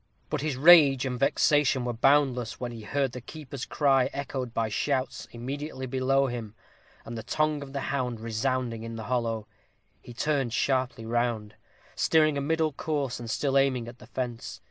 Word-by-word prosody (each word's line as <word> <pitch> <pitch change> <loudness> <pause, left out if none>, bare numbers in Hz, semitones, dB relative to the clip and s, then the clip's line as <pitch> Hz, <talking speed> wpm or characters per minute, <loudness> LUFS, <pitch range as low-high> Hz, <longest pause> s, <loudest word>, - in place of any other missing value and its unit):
But - - -1
his 150 -3 -2
rage 140 -4 +7
and 125 -2 -3
vexation 140 -2 +3
were 120 - -1
boundless, 130 -1 +2
when 125 -1 -4
he 115 -1 -8
heard 135 +4 -1
the 125 - -7
keeper's 140 0 -7
cry 135 -3 +3
echoed 130 -3 -4
by 115 -1 0
shouts 130 +5 -2
immediately 130 +3 -5
below 135 +1 +2
him, 115 -4 -5 0.5
and 115 - -6
the 110 - -4
tongue 155 +4 0
of 140 -1 -8
the 140 0 -3
hound 125 -4 -2
resounding 115 +1 -2
in 115 0 -6
the 110 - -6
hollow. 115 -3 -1 0.5
He 120 - -12
turned 135 -3 0
sharply 130 -4 0
round, 115 -2 -1 0.4
steering 155 -2 +3
a 140 - -1
middle 160 +1 0
course, 140 -4 -2
and 120 -1 -7
still 135 +4 0
aiming 130 -4 +1
at 120 +1 -10
the - - -14
fence. 120 -3 -5
130 Hz, 175 wpm, -27 LUFS, 120-140 Hz, 0.5 s, rage